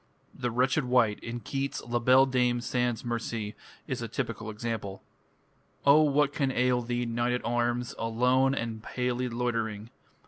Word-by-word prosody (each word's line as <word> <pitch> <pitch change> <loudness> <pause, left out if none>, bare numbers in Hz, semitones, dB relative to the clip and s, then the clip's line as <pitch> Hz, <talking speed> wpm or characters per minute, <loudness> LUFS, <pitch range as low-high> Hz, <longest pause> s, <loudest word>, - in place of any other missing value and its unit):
The 125 -2 -2
"wretched 130 +4 +1
wight" 120 -4 +3
in 120 0 -6
Keats' 135 +2 -3
"La 120 0 0
Belle 130 +3 +6
Dame 125 -2 +1
Sans 120 0 -1
Merci" 115 -2 -3 0.3
is - - -3
a - - -3
typical 110 - -4
example. 105 -3 -5 0.8
O 140 +2 +7
what 145 -1 +3
can 135 -2 0
ail 125 -1 +2
thee, 120 0 -2
knight 120 +1 0
at 125 - -2
arms, 120 +1 0
Alone 125 +4 +2
and 115 -3 -4
palely 125 +1 -2
loitering? 115 -2 -2
120 Hz, 150 wpm, -29 LUFS, 115-125 Hz, 0.8 s, O